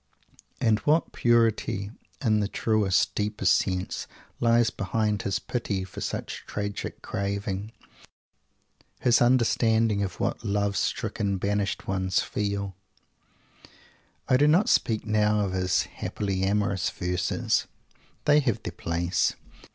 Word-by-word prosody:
And 110 -2 +3
what 155 +8 +2
purity 115 -4 +2 0.3
in 110 -2 +3
the 105 - 0
truest, 105 -3 +1
deepest 105 -3 +2
sense, 95 -1 -2 0.3
lies 115 -1 +3
behind 105 0 -1
his 100 -1 -1
pity 105 -6 -3
for 95 - -8
such - - -4
tragic 100 -1 -4
craving; 100 0 -3 1.3
his 120 -1 +3
understanding 115 -3 +3
of 95 -2 -3
what - - -1
love 100 0 0
stricken, 100 +1 -1
banished 100 +1 -1
ones 95 -1 +1
feel. 100 -2 -2 1.5
I 130 - +4
do 145 +3 +4
not 170 +7 +4
speak 110 -2 +2
now 105 -1 +2
of 100 -2 -1
his 90 -1 +1
happily 95 -2 -3
amorous 100 -1 +1
verses. 90 0 -1 0.6
They 145 0 +6
have 125 -7 -1
their - - -4
place. 85 +2 0
105 Hz, 120 wpm, -26 LUFS, 95-110 Hz, 1.5 s, They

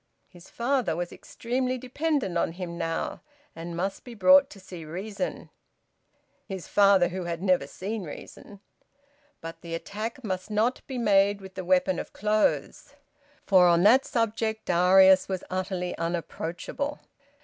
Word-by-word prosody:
His 175 -1 -16
father 255 0 0
was 175 0 -4
extremely 255 +2 -3
dependent 260 - -2
on 170 -1 0
him 175 -1 -6
now, 165 -1 -3 0.3
and 170 +1 -7
must 195 +2 -3
be 245 -2 -10
brought 275 +7 +6
to 200 - -13
see 185 -3 -10
reason. 200 - -5 1.0
(His 190 -3 -6
father 195 -3 +4
who 185 0 -5
had 170 +1 -4
never 185 -7 +2
seen 200 +6 -5
reason!) 195 +5 -11 0.8
But 165 0 -8
the 165 -1 -5
attack 220 +8 -6
must 185 -2 -4
not 220 +4 0
be 265 - -5
made 200 -3 +3
with 190 -1 -11
the 185 - -6
weapon 185 0 +2
of - - -7
clothes, 210 +1 0 0.5
for 185 -3 +6
on 170 0 +4
that 250 +6 +6
subject 220 -1 -1
Darius 185 +2 +5
was 190 -1 -3
utterly 185 -1 -3
unapproachable. 170 - -4
190 Hz, 145 wpm, -27 LUFS, 175-220 Hz, 1.0 s, brought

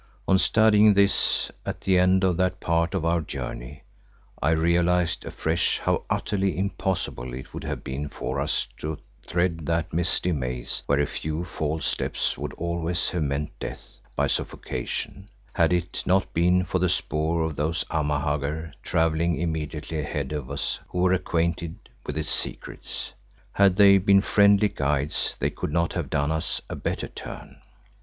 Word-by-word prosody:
On 95 -1 +5
studying 110 -1 +5
this 100 0 +3
at - - -5
the 95 -1 +3
end 95 +1 +4
of 90 -2 +3
that 90 0 +1
part 85 +2 +1
of 85 -4 -1
our 85 0 +2
journey 70 -1 -6 0.6
I 75 - +2
realised 85 +1 +2
afresh 85 +2 0
how - - 0
utterly 95 -4 0
impossible 95 - -2
it 65 - -9
would - - -6
have - - -4
been 70 +3 -4
for - - -4
us - - 0
to 75 0 -4 0.2
thread 85 -3 -1
that 85 +1 0
misty 85 +2 +1
maze 65 -5 -2
where 70 0 +3
a 75 - +3
few 80 +4 -4
false 80 -1 -2
steps - - -1
would - - -5
always 85 0 -1
have 90 - -1
meant 70 0 -1
death - - -8 0.2
by - - +2
suffocation, 60 -2 -3 0.3
had 85 0 +3
it 90 0 -1
not 95 +1 +2
been 90 +2 +3
for 90 - -1
the 90 0 +2
spoor 80 -1 +1
of 80 -2 -2
those 80 +4 0
Amahagger 75 0 -1
travelling 80 +1 +1
immediately 80 -1 -3
ahead 75 -2 -3
of 75 -4 -4
us 70 0 -2
who - - -6
were 90 0 +4
acquainted 85 -2 0 0.3
with 75 - -3
its 80 -1 -2
secrets. - - -4 0.4
Had 100 -2 +4
they 100 -1 +7
been 100 +1 +5
friendly 100 0 +5
guides 75 -4 -1
they - - 0
could - - -4
not 85 +1 +1
have - - -3
done 70 +2 0
us 80 0 -1
a - - -5
better - - -3
turn. - - -9
85 Hz, 165 wpm, -25 LUFS, 75-90 Hz, 0.6 s, they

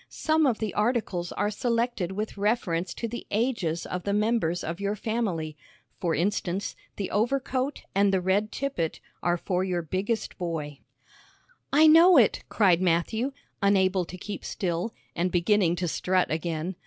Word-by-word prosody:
Some 315 -1 +2
of 240 -4 +1
the 220 -2 -3
articles 210 -6 0
are 205 - 0
selected 230 -4 -1
with 215 +2 -4
reference 200 -4 0
to 230 - -3
the 240 +2 -7
ages 205 -8 -1
of 180 - -4
the 200 +2 -2
members 210 -5 +1
of 170 +3 -4
your 200 +1 -1
family. 195 -9 -2 0.4
For 170 -4 0
instance, 190 +1 -1 0.2
the 195 - -4
overcoat 260 +4 0
and 200 0 +3
the 190 - +2
red 195 +4 +1
tippet 260 - -2 0.2
are 175 0 +1
for 180 +1 -1
your 180 -2 -1
biggest 195 +9 -2
boy.'" 155 -5 -4 0.9
"I 300 +3 +6
know 330 +3 +8
it," 230 -6 +4
cried 185 -5 +3
Matthew, 185 +9 +1 0.3
unable 190 -2 +3
to 180 - -9
keep 200 +2 -6
still, 180 +3 -2 0.2
and 175 +2 0
beginning 175 0 +3
to 175 0 -2
strut 185 +3 +1
again. 165 +2 -2
195 Hz, 155 wpm, -27 LUFS, 175-225 Hz, 0.9 s, know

